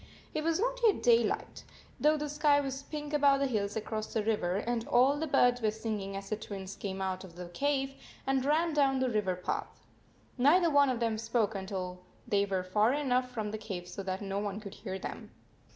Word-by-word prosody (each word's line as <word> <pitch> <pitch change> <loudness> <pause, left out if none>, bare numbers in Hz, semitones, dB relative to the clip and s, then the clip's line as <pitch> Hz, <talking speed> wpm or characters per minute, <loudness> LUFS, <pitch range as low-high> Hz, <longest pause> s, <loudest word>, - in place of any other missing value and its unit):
It 310 - -1
was 330 +1 +1
not - - 0
yet 435 -4 +4
daylight, 235 -3 +2 0.4
though 305 +1 +4
the 300 0 -3
sky 295 0 +3
was 270 -1 -3
pink 295 +1 -6
above 280 -2 +4
the 280 - +2
hills 210 -6 -1
across 215 0 -3
the 220 - 0
river 205 -5 0
and 230 +3 -1
all 255 +4 +4
the 315 +2 -2
birds 245 -3 +3
were 220 - +3
singing 210 -2 -4
as 195 +1 -8
the - - +2
Twins 200 -2 -7
came 195 -1 -4
out 185 0 -2
of 175 -3 -12
the 175 0 -7
cave 275 +5 0 0.3
and 270 -1 +1
ran 315 +4 +2
down 275 -3 +3
the 260 -1 +1
river 205 -4 0
path. 180 - -4 0.5
Neither 330 +6 +5
one 285 -1 +5
of 245 -2 -1
them 225 -2 0
spoke 225 -1 0
until 190 -2 -5 0.3
they 200 -1 +2
were 190 -2 -1
far 210 +6 +2
enough 255 -3 +1
from 220 -4 -3
the 215 - -4
cave 190 -5 -6
so 180 +2 -6
that 190 +1 -3
no 195 0 -2
one 205 0 -3
could 205 -2 -9
hear 190 -3 -5
them. - - -7
225 Hz, 215 wpm, -31 LUFS, 200-280 Hz, 0.5 s, Neither